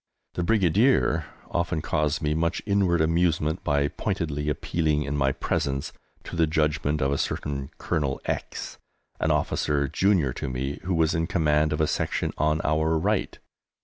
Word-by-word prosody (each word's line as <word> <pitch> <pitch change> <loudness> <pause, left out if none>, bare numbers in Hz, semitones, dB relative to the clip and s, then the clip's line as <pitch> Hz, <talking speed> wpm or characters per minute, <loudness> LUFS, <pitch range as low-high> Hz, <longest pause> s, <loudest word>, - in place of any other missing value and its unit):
The - - -2
Brigadier 95 - +3 0.2
often 85 -1 0
caused 75 -1 0
me 75 0 +1
much 85 +2 -1
inward 95 -5 +2
amusement 80 0 +1
by 70 -1 +2
pointedly 75 0 -2
appealing 75 +1 0
in 75 +1 -3
my 70 -2 +2
presence 70 0 -2 0.3
to - - -7
the 80 -1 +3
judgment 75 -1 0
of 70 - +1
a 70 - 0
certain 70 -2 -3
Colonel 70 -3 -1
X, - - -4 0.4
an - - +1
officer 70 -1 +1
junior 85 -5 +2
to - - -4
me, 65 +3 -3
who 90 -1 0
was 80 -1 +2
in 80 0 0
command 75 -4 +2
of 75 - -1
a 80 - +3
section - - -1
on 75 0 +2
our 80 +1 +2
right. 100 +5 0
75 Hz, 160 wpm, -26 LUFS, 75-85 Hz, 0.4 s, Brigadier